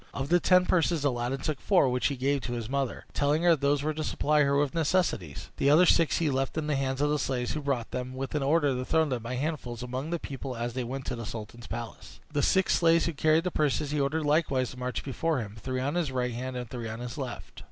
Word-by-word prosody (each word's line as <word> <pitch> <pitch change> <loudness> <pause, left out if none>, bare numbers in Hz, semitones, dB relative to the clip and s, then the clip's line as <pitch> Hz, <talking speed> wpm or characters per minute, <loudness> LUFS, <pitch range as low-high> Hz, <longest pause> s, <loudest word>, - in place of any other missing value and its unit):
Of 135 0 -3
the 175 +1 +5
ten 180 +1 +4
purses 170 -4 +1
Aladdin 125 0 -1
took 150 -2 -3
four, 185 -8 +4
which 125 0 +1
he 140 - -2
gave 140 +2 +1
to 120 - -4
his 115 -3 -4
mother, 135 -1 -2
telling 150 +3 +1
her 175 -1 +6
those 140 0 +1
were 155 +1 0
to 155 +1 -3
supply 150 0 +2
her 140 -1 +3
with 145 -2 +1
necessaries; 160 - -1
the 140 - +2
other 160 +5 +7
six 165 -2 +4
he 160 -3 +1
left 135 +3 -1
in 155 - -1
the 150 -1 0
hands 135 0 -1
of 145 0 +2
the 150 - +1
slaves 125 -2 -1
who 150 - -3
brought 135 -5 -2
them, 125 0 -4
with 135 0 -4
an 150 - 0
order 145 0 +2
to 125 0 -2
throw 160 +4 +2
them 130 -5 -2
by 120 +3 -4
handfuls 125 -4 -3
among 130 +5 -4
the 170 - -1
people 135 -4 -6
as 120 +1 -3
they 130 0 -2
went 130 +2 -5
to 125 - -3
the 115 - -6
sultan's 110 +2 -8
palace. - - -7
The 145 - +1
six 190 +5 +3
slaves 165 -1 +4
who 170 - -1
carried 155 +3 +3
the 180 - -1
purses 150 -1 0
he 150 -1 0
ordered 150 +3 0
likewise 145 -4 +1
to 125 - -11
march 125 -3 -3
before 155 +3 -1
him, 110 -4 -5
three 130 +4 -3
on 135 +3 -1
the 170 -5 -1
right 125 -1 -1
hand 130 +2 -4
and 125 -1 -4
three 115 -1 -5
on 110 - -5
the 125 +3 -6
left. 125 -3 -7
140 Hz, 265 wpm, -28 LUFS, 125-155 Hz, -, other